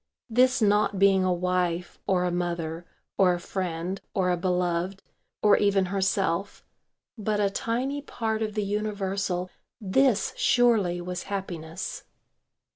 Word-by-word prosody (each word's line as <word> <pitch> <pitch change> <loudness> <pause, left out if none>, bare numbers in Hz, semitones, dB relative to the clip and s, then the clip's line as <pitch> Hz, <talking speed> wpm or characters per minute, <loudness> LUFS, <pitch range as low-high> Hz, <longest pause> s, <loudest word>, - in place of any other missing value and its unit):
This 255 +1 +4
not 205 -1 +3
being 195 -1 +4
a 185 - +2
wife, 180 -1 -1
or 185 -2 +2
a 180 - 0
mother, 170 -1 -3 0.3
or 180 -2 +5
a - - -5
friend, 180 0 -3
or 180 -1 +2
a - - +2
beloved, 180 +1 -1 0.4
or 210 -1 +6
even 200 -2 +3
herself, 195 -1 0 0.5
but 210 0 0
a 200 -1 +2
tiny 255 +7 -2
part 225 -5 -3
of 215 -1 -2
the 210 - 0
universal, 195 -3 -2 0.3
this 220 +1 +2
surely 215 -8 +3
was 180 +1 -5
happiness. 185 -2 -5
195 Hz, 130 wpm, -27 LUFS, 180-210 Hz, 0.5 s, or